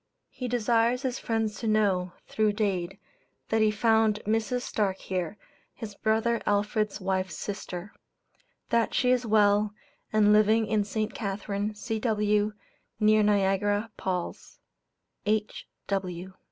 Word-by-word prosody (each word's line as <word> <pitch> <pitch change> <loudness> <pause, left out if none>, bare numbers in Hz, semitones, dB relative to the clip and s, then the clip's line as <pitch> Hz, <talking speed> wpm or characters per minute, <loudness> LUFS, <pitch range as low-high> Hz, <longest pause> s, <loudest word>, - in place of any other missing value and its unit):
He 250 - -5
desires 235 +1 +2
his 260 -1 -2
friends 220 -3 -1
to 225 - -3
know, 195 -4 +2
through 215 -1 +1
Dade, 195 -3 -1 0.5
that 220 0 +2
he 215 - +5
found 220 0 +3
Mrs. 225 +3 0
Starke 195 -3 -1
here, 185 +1 -3 0.4
his 215 -2 -7
brother 225 +3 +1
Alfred's 210 +1 0
wife's 185 -3 -2
sister; 195 -1 -6 0.8
that 235 -1 +1
she 250 -1 +3
is 250 -2 +1
well, 210 -1 +3 0.4
and 210 -1 +5
living 215 +1 +4
in 210 -1 +1
St. 215 +1 -2
Catharine, 205 0 -3
C.W., 210 -2 0 0.5
near 215 0 +5
Niagara 205 +1 +2
Palls. 180 -2 -4 0.7
H. 215 0 -1
210 Hz, 120 wpm, -28 LUFS, 205-220 Hz, 0.8 s, he